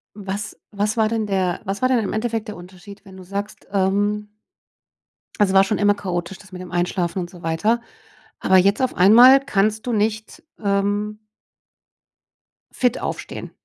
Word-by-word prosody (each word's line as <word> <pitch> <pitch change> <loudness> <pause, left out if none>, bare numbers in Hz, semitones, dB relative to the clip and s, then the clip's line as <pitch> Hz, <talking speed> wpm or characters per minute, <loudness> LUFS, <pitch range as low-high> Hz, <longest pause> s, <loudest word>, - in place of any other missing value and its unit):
Was 205 +1 -5
was 210 +2 -1
war 220 -1 +3
denn 220 -1 -2
der 190 -3 -1
was 195 +3 -4
war 255 - +2
denn 255 -2 +3
im 200 - -3
Endeffekt 225 +1 -2
der 210 - -6
Unterschied, 185 +3 -13
wenn 190 -1 -13
du 185 - -11
sagst, 200 +3 -6
ähm 205 +2 0 1.1
es 205 -3 +2
war 195 0 +6
schon 195 +2 -1
immer 205 0 +3
chaotisch, 185 -2 -4
das 200 - -17
mit 185 0 -8
dem 180 - -10
Einschlafen 175 0 -1
und 175 -1 -4
so 175 -2 -14
weiter. 210 +9 0 0.6
Aber 190 - +4
jetzt 200 +6 +3
auf 255 - 0
einmal 240 +8 +8
kannst 215 -3 0
du 245 - -2
nicht, 215 +1 -2 0.2
ähm 205 +1 -1 1.5
fit 250 -1 0
aufstehen. - - -6
205 Hz, 165 wpm, -21 LUFS, 190-215 Hz, 1.5 s, einmal